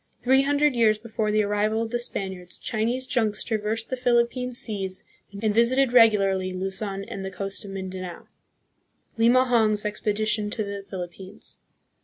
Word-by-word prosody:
Three 265 +2 +5
hundred 290 +1 +2
years 225 -3 +4
before 215 -1 -3
the 215 0 +3
arrival 210 +2 +1
of 225 - -5
the 240 - 0
Spaniards, 190 -6 -4
Chinese 235 +3 -1
junks 225 -5 0
traversed 220 +1 -2
the - - +1
Philippine 250 0 +1
seas 195 -6 -3 0.4
and 215 -1 +2
visited 245 +3 +3
regularly 195 -5 +4
Luzon 195 +1 -3
and 200 -2 -6
the 190 - -3
coast 195 +1 -5
of - - -8
Mindanao. 185 -2 -6 0.9
Limahong's 230 -3 +4
Expedition 210 0 0
to 215 +1 -2
the 200 0 -5
Philippines. 185 +2 -7
215 Hz, 145 wpm, -25 LUFS, 195-235 Hz, 0.9 s, Three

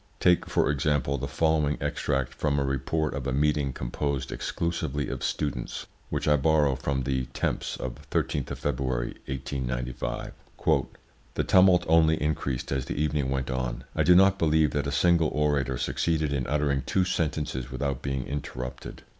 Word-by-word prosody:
Take, 90 -1 +3
for - - +2
example, 70 -1 0
the - - -3
following 80 -2 +1
extract 65 -2 -1
from 70 +2 0
a 70 - +2
report 70 +3 -1
of 70 -1 -4
a - - 0
meeting 70 0 +1
composed 65 +2 -3
exclusively 80 -4 -2
of - - -4
students, 65 -5 -2 0.2
which - - -2
I 75 -1 +5
borrow 75 -1 +3
from 65 0 -2
the 65 -1 -1
Temps - - -2
of 70 +3 -7
13th 70 0 -1
of - - -4
February, 65 -2 -1
1895: 65 -2 -3 1.0
"The - - +1
tumult 90 -1 +5
only 80 0 +4
increased 70 -4 -2
as 65 -2 -1
the - - -4
evening 75 -3 0
went 65 -1 -1
on; 65 -2 -2
I - - +1
do 90 - +6
not 95 +1 +5
believe 80 -1 +3
that 70 -1 -1
a - - -1
single 85 0 +3
orator 70 -4 +1
succeeded 80 +2 0
in 65 -3 -1
uttering 70 -1 +1
two 95 - +2
sentences 75 -7 -2
without 70 0 -2
being 65 -2 -2
interrupted. 65 -3 -6
70 Hz, 165 wpm, -27 LUFS, 65-75 Hz, 1.0 s, do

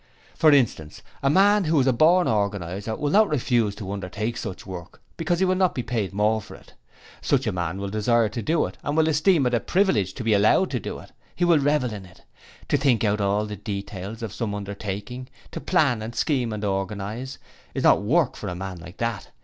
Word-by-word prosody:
For 155 - +4
instance 115 - +1 0.2
a 135 - +2
man 200 +5 +4
who 155 -1 +2
is 130 - +3
a 130 - +3
born 170 +8 +4
organizer 100 0 -2
will 145 +3 -2
not 215 +3 +5
refuse 120 -7 +1
to 100 -2 -6
undertake 100 +4 -4
such 100 -5 -6
work 90 -3 -9 0.2
because 170 +1 -1
he 190 - +2
will 185 - +2
not 185 -1 +1
be 125 - -2
paid 110 -5 -2
more 105 +2 +1
for - - -12
it. - - -18 0.5
Such - - +1
a - - 0
man 85 0 -3
will 100 0 -4
desire 115 +2 +2
to 110 +3 -5
do 160 +9 +1
it - - -9
and 145 +2 -2
will 160 0 +4
esteem 155 0 +3
it 125 - 0
a 120 - +3
privilege 115 - +1
to - - -5
be 110 -1 +2
allowed 105 - +3
to 125 - -1
do - - -6
it. - - -13 0.2
He 175 - +1
will 170 -3 +5
revel 140 -4 +1
in 100 -3 -8
it. 90 - -20 0.5
To - - +3
think 135 -5 +2
out 105 -1 +1
all 100 +1 +1
the 105 -1 -6
details 100 +2 -6
of 110 -2 -5
some 110 -3 -3
undertaking, 100 +4 -6 0.2
to - - -6
plan 145 -11 +2
and 115 +2 -6
scheme 130 -6 0
and 105 -1 -4
organize, 105 +6 -3 0.4
is - - -2
not - - +5
work 145 +7 +2
for 105 - -7
a 90 - -4
man 95 -1 -6
like 90 +2 -12
that. 115 -3 -3
110 Hz, 225 wpm, -24 LUFS, 100-145 Hz, 0.5 s, not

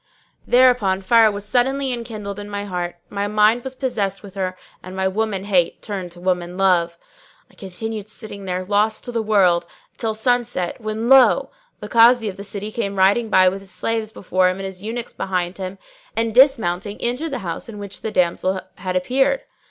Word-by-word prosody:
Thereupon 245 -7 +4
fire 225 +3 +5
was 200 0 -6
suddenly 260 +4 +1
enkindled 215 -4 -6
in 205 0 -8
my 205 0 -4
heart; 175 -3 -4 0.2
my 200 0 -2
mind 215 +3 +3
was 265 0 -6
possessed 205 -7 -2
with 200 -2 -11
her 185 -2 -3 0.2
and 185 +1 -9
my 190 0 0
woman 200 0 -1
hate 185 -4 +1
turned 190 -4 -5
to 175 - -14
woman 180 -1 -1
love. 175 -3 +2 0.5
I - - -27
continued 210 +2 -6
sitting 210 -2 -8
there, 185 0 -3
lost 210 +2 +1
to 245 - -4
the 230 -1 -1
world, 185 -5 +3 0.3
till 220 -2 -2
sunset 240 -4 -1
when 215 +1 -3
lo! 265 -1 +5 0.3
the 210 - -6
Kazi 230 +1 +5
of 195 - -5
the 200 - -7
city 205 +1 -5
came 200 -3 -3
riding 200 +4 +3
by 185 -2 +5
with 190 +2 0
his 195 -1 -13
slaves 220 +4 -2
before 185 -2 +1
him 185 - -3
and 195 - -5
his 190 -1 -7
eunuchs 230 +3 -5
behind 180 -1 -2
him, 190 +1 -5 0.4
and 225 0 0
dismounting 215 -7 +3
entered 250 +7 -1
the 275 - -3
house 170 +6 -4
in 215 - -8
which 200 -1 -8
the 220 - -3
damsel 185 0 +1 0.2
had 185 -1 -4
appeared. 265 - +1
205 Hz, 190 wpm, -21 LUFS, 185-230 Hz, 0.5 s, fire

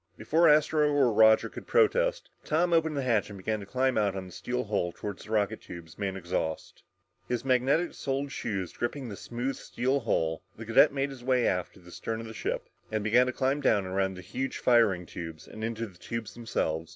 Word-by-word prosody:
Before 165 +1 +4
Astro 150 0 +4
or 135 -5 +3
Roger 110 +1 +6
could - - -10
protest, - - +2 0.2
Tom 170 +3 +1
opened 160 -2 +2
the 140 - 0
hatch 115 -5 +1
and 100 - -8
began 110 +3 -2
to 100 - -9
climb 130 +3 +1
out 100 -2 +1
on 95 -1 -4
the 90 - -11
steel 125 +7 -3
hull 100 -5 -1
toward 100 +2 -6
the - - -12
rocket 105 -2 0
tubes, 85 -1 -11
main 100 -2 -2
exhaust. 85 -3 -3 0.5
His 125 0 -2
magnetic 135 +6 +2
soled 140 +1 -3
shoes 95 -8 -3
gripping 125 +1 -3
the 100 - -6
smooth 120 +5 -4
steel 130 +3 -1
hull, 80 -9 0 0.2
the 115 - -7
cadet 115 +7 +6
made 140 0 -1
his 130 -3 -10
way 125 -1 +2
aft 90 -1 -1
to - - -15
the 90 0 -14
stern 115 +4 -4
of 115 - -6
the 110 - -8
ship - - -3 0.2
and 110 -1 -1
began 120 +4 +4
the - - 0
climb 135 +2 0
down 105 -7 +3
around 95 0 -1
the 90 - -8
huge 130 +9 -4
firing 110 -8 +3
tubes 80 -2 -8
and 110 - -8
into 115 0 -2
the 95 -5 -14
tubes 115 -3 -5
themselves. 80 -9 -2
115 Hz, 215 wpm, -29 LUFS, 100-135 Hz, 0.5 s, Roger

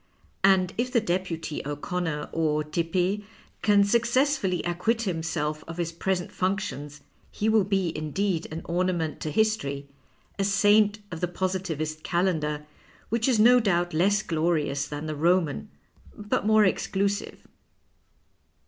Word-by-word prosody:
And 190 -2 +4
if 250 +1 0
the 235 - +4
deputy 175 -6 -2
O'Connor, 150 +1 -3
or 155 -2 0
Tepe, 175 +6 -1 0.4
can 205 -1 +5
successfully 235 -1 +1
acquit 220 +7 0
himself 160 -5 -2
of 165 +1 -7
his 170 -1 -2
present 180 +1 -2
functions 150 -7 -3 0.3
he 210 - -2
will 220 -2 +4
be 190 -4 0
indeed 165 +3 -1
an 160 +1 -5
ornament 175 -2 -1
to 155 - -3
history, 150 -8 0 0.5
a - - +2
saint 205 +1 +4
of 165 - -5
the 180 - +1
Positivist 175 -4 -3
Calendar, 155 -5 0 0.4
which 230 +2 0
is 245 -5 +3
no 245 +3 +7
doubt 175 -6 +1
less 200 +6 +2
glorious 155 -5 0
than 150 +1 -5
the 155 -1 -3
Roman, 170 +3 +1 0.5
but 210 0 -1
more 215 -1 +5
exclusive." 200 +2 -1
180 Hz, 130 wpm, -26 LUFS, 160-205 Hz, 0.5 s, no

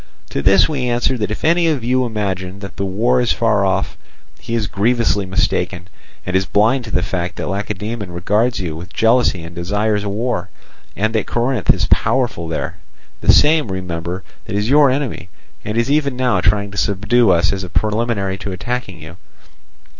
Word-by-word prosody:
To - - -2
this 95 +3 +5
we 130 -5 -2
answer 120 +2 +1
that 105 - -1
if 110 - -4
any 170 +1 +3
of 145 -7 0
you 125 +1 +1
imagine 95 -4 -3
that 100 -1 -9
that 100 - -1
war 120 +6 +1
is 120 - +2
far 105 -4 +2
off, 95 0 -1 0.4
he 115 - -4
is 115 -2 0
grievously 100 0 +1
mistaken, 90 -2 -1 0.4
and 90 - -2
is 95 0 +2
blind 115 +6 +2
to 110 - -8
the 90 - +1
fact 90 -2 -3
that - - -4
Lacedaemon 105 0 -4
regards 105 +7 0
you 85 -5 -4
with 85 +3 -9
jealousy 115 -6 +2
and 85 +1 -9
desires 105 +4 0
war, 100 -2 -2 0.5
and 110 +2 0
that 110 -3 0
Corinth 120 +2 -1
is - - 0
powerful 120 -10 +1
there—the - - -2
same, 150 -7 +4
remember, 90 0 -4 0.2
that - - -5
is 105 +4 0
your 145 -1 +6
enemy, 130 -8 -2 0.3
and 105 +2 -3
is 120 +4 +1
even 140 -3 +1
now 125 -7 +1
trying 100 0 +1
to 100 - -3
subdue 105 +3 +2
us 90 +1 +3
as 95 -1 -4
a 90 - -6
preliminary 105 -2 -1
to 100 - -5
attacking 95 -2 -4
you. 80 +3 -11
105 Hz, 185 wpm, -18 LUFS, 95-120 Hz, 0.5 s, your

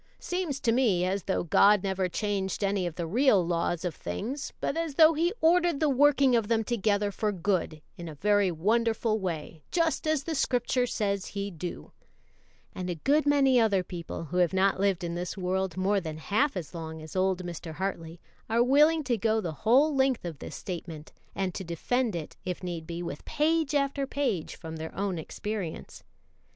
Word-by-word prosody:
Seems 355 -6 -3
to 230 - +2
me 220 -8 +2
as 190 0 -2
though 190 - 0
God 200 +4 +5
never 190 -1 -1
changed 200 0 -2
any 195 -2 0
of 165 - -6
the 170 - -3
real 210 - +3
laws 170 0 -1
of 175 - -2
things, 235 - -5
but - - -1
as 330 -3 -2
though 320 +1 +7
He 335 +3 +1
ordered 345 -2 +3
the 305 -2 +2
working 275 -1 +4
of 225 -3 +1
them 225 0 +1
together 205 -2 0
for 210 +1 -1
good 175 -5 -1 0.2
in 170 -1 -6
a 155 - -9
very 205 +4 +2
wonderful 220 +5 +1
way, 165 -4 -5
just 330 -2 0
as 310 -3 +1
the 330 - -3
Scripture 250 -2 +1
says 200 -4 -1
He 200 0 -4
do;" 175 0 -7 0.8
and 180 0 -5
a 175 - -2
good 290 - +2
many 270 -3 +4
other 200 -5 +3
people, 170 -2 -6
who 165 +3 -4
have 175 -1 +3
not 190 0 +2
lived 195 -2 +1
in 170 0 -3
this 175 +3 -4
world 190 -1 -1
more 195 +2 +1
than 160 -2 -6
half 215 - 0
as 170 -2 -6
long 160 -1 -6
as 155 +2 -10
old 185 -1 +1
Mr. 170 -1 -6
Hartley, 170 -3 -4 0.3
are 230 +2 +3
willing 300 +5 +4
to 245 -4 0
go 220 +1 +2
the 175 -6 -3
whole 255 - +3
length 265 -6 +1
of 165 -5 -6
this - - -8
statement, 165 -4 -7 0.2
and 190 -2 -1
to 190 - -5
defend 215 +6 -1
it, 160 -3 -6
if 180 0 -4
need 170 -3 -5
be, 170 +1 -5
with 150 -4 -6
page 310 0 +1
after 275 -1 0
page 265 - -2
from 160 -1 -8
their 160 0 -7
own 195 -3 -2
experience. 200 +1 -5
200 Hz, 195 wpm, -28 LUFS, 175-260 Hz, 0.8 s, though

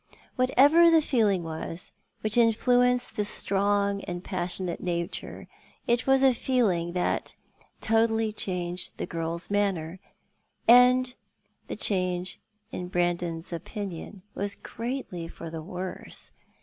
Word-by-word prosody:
WhatcTer 285 +7 +5
the 330 -1 +6
feeling 220 - +1
was 165 +1 -5 0.3
which 215 0 +1
influenced 245 +2 +3
this 210 0 -1
strong 200 0 0
and 175 0 -5
passionate 180 -1 -2
nature, 170 -1 -4 0.4
it 240 +1 +1
was 270 0 +4
a 265 -1 +6
feeling 205 -10 0
that 180 -1 -1 0.5
totally 225 0 +2
changed 180 -3 -3
the - - -3
girl's 165 +2 -4
manner 190 -4 0 0.4
— - - -44 0.2
and 250 +1 +6 0.5
the - - -4
change, 185 -2 0 0.3
in 180 - -5
Brandon 175 -1 0
s 165 +2 -9
opinion, 190 +1 -6
was 200 0 0
greatly 230 -8 -5
for 165 -1 -9
the 160 -1 -5
worse. 180 +3 -3
200 Hz, 125 wpm, -27 LUFS, 175-235 Hz, 0.5 s, the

